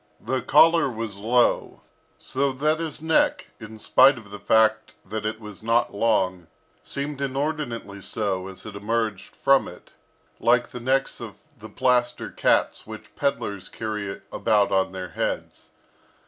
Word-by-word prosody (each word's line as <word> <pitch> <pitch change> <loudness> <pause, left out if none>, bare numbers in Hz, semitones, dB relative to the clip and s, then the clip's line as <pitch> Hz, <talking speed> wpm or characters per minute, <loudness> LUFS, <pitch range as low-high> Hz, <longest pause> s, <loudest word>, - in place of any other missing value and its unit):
The 130 -1 -2
collar 160 +3 +5
was 110 -4 -5
low, 120 +4 +1 0.4
so 140 +1 -1
that 155 +4 +1
his 160 -2 -4
neck, 160 0 +2
in 110 +1 -10
spite 130 +5 +5
of 105 -4 -12
the 105 - -7
fact 110 +1 +2
that 110 +2 -3
it 110 0 -4
was 105 -3 -10
not 115 +1 +1
long, 95 -5 +1 0.4
seemed 140 0 -4
inordinately 135 -7 -3
so 95 -3 -2
as 95 -1 -9
it 105 -2 -8
emerged 110 0 -2
from 135 -1 +3
it, 90 - -13 0.5
like 120 +1 +3
the 125 - -6
necks 130 +3 0
of - - -8 0.2
the - - -11
plaster 125 -1 +1
cats - - +1
which - - -11
pedlars 115 -9 -2
carry 105 -3 -4
about 105 -3 +2
on 95 -1 +2
their 95 -1 -6
heads. - - -4
115 Hz, 145 wpm, -24 LUFS, 105-135 Hz, 0.5 s, collar